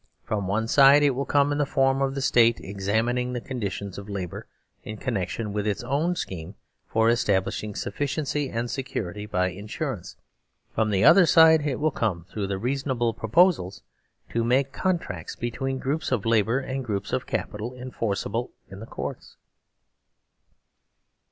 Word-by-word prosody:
From 105 -2 -2
the - - -4
one 110 +3 0
side 140 +3 +7
it 145 -2 +4
willcome 140 +2 +1
in 145 - -1
the 145 - +2
form 135 0 +2
of 135 0 0
the 135 - -2
State 115 -3 +4
examining 110 +6 -1
the 125 - -2
con 125 0 -6
ditions 100 -1 -4
of 100 +1 -10
labour 95 -4 -5 0.4
in 110 0 -7
connection 105 -2 -3
with 105 0 -1
its 105 +2 -1
own 145 +8 0
schemes 95 - -6 0.3
for 110 0 +2
establishing 105 -2 0
sufficiency 145 0 -2
and 115 0 -3
security 105 -6 -4
by 90 -3 +1
insurance. 105 - -5 0.6
From 110 -1 +1
the 95 -2 +1
other 180 - +7
side 160 -2 +6
it 135 -4 -2
will 155 +1 +2
come 95 -10 -2
through 100 -2 -2
the 100 -1 -2
reason 135 +6 -2
able 120 -3 +1
proposals 110 - +2 0.5
to 115 - 0
make 130 +3 +2
contracts 165 - -2
between 130 +3 -3
groups 140 +4 -2
of 115 -5 0
labour 115 +1 +3
and 135 0 -3
groups 105 -5 -3
of - - -1
capital 105 +4 -3
enforceablein 120 -2 -3 0.2
the 100 +4 -9
Courts. - - -7
115 Hz, 160 wpm, -25 LUFS, 100-135 Hz, 0.6 s, side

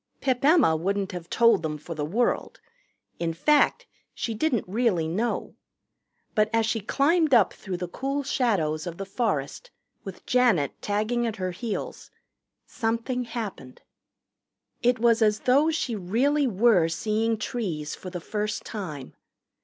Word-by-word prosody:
Pip 255 -2 0
Emma 300 - +5
wouldn't 195 +4 -1
have 175 -2 -7
told 230 -5 +4
them 155 -2 -3
for 165 +3 -7
the 155 -2 -4
world. 220 +11 -1 0.6
In 165 -1 -2
fact 295 - +3 0.3
she 230 - -3
didn't 240 -1 0
really 195 -5 +1
know. 210 +9 -2 0.8
But 215 -1 +2
as 225 -1 +2
she 225 0 0
climbed 285 - +2
up 210 -7 +4
through 190 -3 -6
the 180 0 -4
cool 275 +9 -3
shadows 180 - 0
of 170 -1 -6
the 195 - -5
forest, 195 - -2 0.3
with 195 -2 -9
Janet 235 - +2
tagging 215 +4 0
at 220 - -3
her 185 -3 -3
heels, 205 +4 -5 0.6
something 235 +2 -2
happened. 215 - -7 1.0
It 245 0 +3
was 230 0 +3
as 215 -1 +3
though 280 +5 +4
she 290 -7 -1
really 255 +10 +1
were 205 -5 +4
seeing 220 +6 0
trees 175 -10 -3
for 185 - -8
the 180 -1 -5
first 210 +4 -3
time. 155 - -6
215 Hz, 145 wpm, -26 LUFS, 180-240 Hz, 1.0 s, Emma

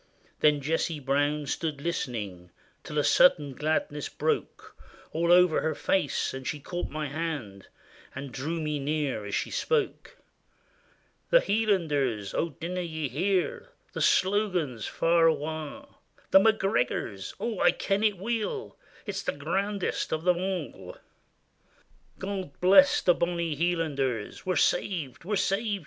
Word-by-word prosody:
There 150 - +5
Jessie 155 +2 -1
Brown 145 +2 0
stood 150 +1 -3
listening 110 - -4 0.3
Till 150 - -6
a 145 - +3
sudden 145 -5 +4
gladness 150 0 -1
broke - - -3 0.4
All 170 +2 +1
over 180 -2 +5
her 160 - -1
face; 180 -8 0
and 130 0 -6
she 150 - -2
caught 175 +5 -4
my 155 0 -3
hand 140 - -5 0.5
And 135 0 -6
drew 155 +7 -3
me 150 -2 -2
near 140 -6 -2
as - - -2
she - - -2
spoke: 465 -2 -1 0.4
— - - -37
" - - -40
The - - +7
Hielanders! 150 - 0
Oh, 170 - 0
dinna 180 +2 -3
ye 160 -4 -3
hear 195 - -1 0.2
The - - -4
slogan 185 - +2
far 165 +9 +2
awa'? 155 -1 -4 0.3
The 190 - +9
McGregor's. 195 - 0
Oh! 230 -3 -2
Ikenitweel; 215 - 0 0.3
It's 200 -2 -3
the - - -2
grandest 195 +7 -2
o' 160 - +2
them 175 +2 +1
a'! 175 - -4 0.6
" - - -36
God 190 -6 -5
bless 200 +11 +6
the 180 - +5
bonny 170 -2 -1
Hielanders! 145 - -1
We 185 - +2
're - - -1
saved! 160 - 0
we 210 - -2
're - - +2
saved!" 200 +1 0
165 Hz, 140 wpm, -28 LUFS, 145-190 Hz, 0.6 s, The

